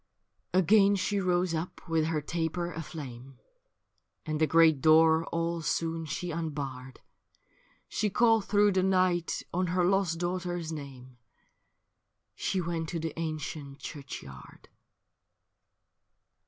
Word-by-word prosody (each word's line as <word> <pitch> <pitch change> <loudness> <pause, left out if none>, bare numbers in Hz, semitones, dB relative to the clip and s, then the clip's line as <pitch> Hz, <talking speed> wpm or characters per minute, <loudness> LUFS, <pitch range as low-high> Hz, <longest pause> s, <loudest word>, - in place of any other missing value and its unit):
Again 195 +2 +5
she 200 +1 0
rose 180 -2 +1
up 165 +3 -5
with 165 -1 +1
her 160 -2 -1
taper 170 +3 -2
aflame, 135 -6 -8 0.9
And 155 -1 -2
the 155 - +4
great 160 -2 +5
door 160 +1 +5
all 170 0 -2
soon 165 +1 -1
she 175 +4 -4
unbarred; 140 -5 -5 0.9
She 210 - -1
called 225 0 +3
through 205 0 +4
the 190 -1 +2
night 185 -2 +1
on 180 +1 0
her 180 +1 +1
lost 190 -3 +2
daughter's 175 -1 -3
name. 130 -4 -9 1.2
She 190 - -2
went 165 -2 -3
to 170 - -3
the 160 -1 -4
ancient 155 -3 -5
churchyard. 135 - -10
165 Hz, 115 wpm, -29 LUFS, 155-180 Hz, 1.2 s, Again